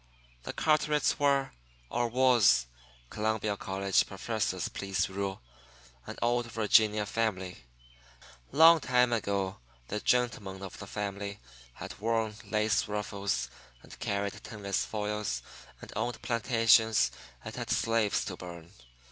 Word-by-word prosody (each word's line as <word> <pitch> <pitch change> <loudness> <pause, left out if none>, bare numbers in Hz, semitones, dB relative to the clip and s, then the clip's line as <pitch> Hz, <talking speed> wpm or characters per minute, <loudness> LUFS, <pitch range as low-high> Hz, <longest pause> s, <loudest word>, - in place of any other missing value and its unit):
The - - -4
Carterets 150 -1 +2
were, 140 -1 +2 0.4
or 120 0 +1
was 120 - +4 0.5
(Columbia 110 -1 -1
College 95 0 +1
professors 95 -2 -2
please 95 -2 -1
rule), 95 -4 -4 0.6
an - - -7
old 120 0 +1
Virginia 105 -1 +3
family. 95 - -2 0.9
Long 165 +3 +8
time 125 -3 +2
ago 100 -3 -1 0.3
the 105 - -2
gentlemen 105 -6 0
of 95 - -8
the 95 - -8
family 100 0 -4 0.3
had - - -9
worn 110 0 0
lace 105 -2 +1
ruffles 100 -10 -2 0.4
and - - -13
carried 100 0 -2
tinless 100 -3 -2
foils 105 -1 -3 0.4
and - - -10
owned 120 - -2
plantations 115 -2 +3 0.3
and - - -6
had - - -5
slaves 115 -1 +1
to 90 - -5
burn. 85 -1 -10
105 Hz, 120 wpm, -30 LUFS, 100-115 Hz, 0.9 s, Long